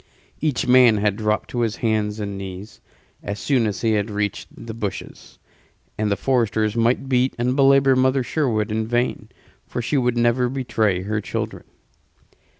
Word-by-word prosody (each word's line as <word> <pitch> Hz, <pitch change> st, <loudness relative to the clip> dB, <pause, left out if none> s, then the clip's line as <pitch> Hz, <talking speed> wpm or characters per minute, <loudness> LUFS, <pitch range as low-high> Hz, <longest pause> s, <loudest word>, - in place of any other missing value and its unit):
Each 150 Hz, -5 st, -1 dB
man 125 Hz, -3 st, +6 dB
had 100 Hz, -1 st, +1 dB
dropped 105 Hz, -1 st, -1 dB
to 120 Hz, -, -3 dB
his 115 Hz, -2 st, 0 dB
hands 110 Hz, -2 st, -1 dB
and 100 Hz, -1 st, -4 dB
knees 95 Hz, +1 st, -8 dB, 0.4 s
as 100 Hz, -, -5 dB
soon 125 Hz, -6 st, +1 dB
as 105 Hz, -, -4 dB
he 115 Hz, -, +1 dB
had 105 Hz, 0 st, 0 dB
reached 105 Hz, -1 st, -3 dB
the 115 Hz, -1 st, -9 dB
bushes; 105 Hz, -3 st, -7 dB, 0.6 s
and 110 Hz, -1 st, -1 dB
the 100 Hz, -, 0 dB
foresters 110 Hz, -3 st, 0 dB
might 120 Hz, +3 st, +1 dB
beat 130 Hz, 0 st, +1 dB
and 125 Hz, +2 st, 0 dB
belabor 135 Hz, -1 st, +5 dB
Mother 130 Hz, +1 st, +2 dB
Sherwood 115 Hz, -6 st, -1 dB
in 110 Hz, 0 st, -1 dB
vain, 120 Hz, +2 st, -1 dB, 0.4 s
for -, -, -5 dB
she 120 Hz, +5 st, -1 dB
would 125 Hz, -1 st, 0 dB
never 120 Hz, +1 st, +2 dB
betray 110 Hz, -8 st, 0 dB
her 105 Hz, +2 st, -2 dB
children. -, -, -5 dB
115 Hz, 165 wpm, -22 LUFS, 105-125 Hz, 0.6 s, man